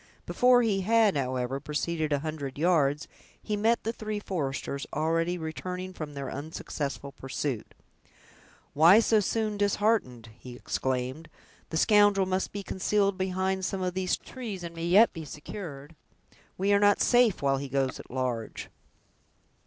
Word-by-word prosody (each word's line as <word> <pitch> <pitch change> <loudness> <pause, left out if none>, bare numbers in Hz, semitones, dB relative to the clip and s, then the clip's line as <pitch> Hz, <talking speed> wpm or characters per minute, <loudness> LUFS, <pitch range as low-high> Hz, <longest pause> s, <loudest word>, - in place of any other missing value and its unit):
Before 245 0 +4
he 200 -4 +1
had, 220 -1 +3
however, 130 -1 -1
proceeded 155 +2 -2
a 145 - +3
hundred 145 -4 -5
yards, 150 -3 +2 0.3
he 210 - -3
met 225 +3 +1
the 225 - -2
three 215 -2 -4
foresters 140 -7 -3
already 165 +3 0
returning 180 +3 -5
from 150 -4 -7
their 140 -2 -5
unsuccessful 140 -1 -5
pursuit. 135 -3 -4 1.0
"Why 170 +8 +7
so 225 -1 +3
soon 215 +1 -1
disheartened!" 200 - 0
he 125 -1 -10
exclaimed; 130 +5 -3 0.4
"the 160 - -2
scoundrel 205 0 +4
must 185 0 -1
be 200 -1 -5
concealed 200 +1 0
behind 190 0 -1
some 190 0 -2
of 180 -1 -1
these 185 0 0
trees, 215 -8 -7
and 170 -1 -6
may 165 0 -4
yet 205 +6 +6
be 165 - -6
secured. 150 0 -8 0.6
We 195 +2 +2
are 200 - +5
not 205 0 +4
safe 240 - +3
while 135 -1 +2
he 140 0 -5
goes 135 -1 -1
at - - -11
large." 125 -3 -3
170 Hz, 150 wpm, -28 LUFS, 140-205 Hz, 1.0 s, Why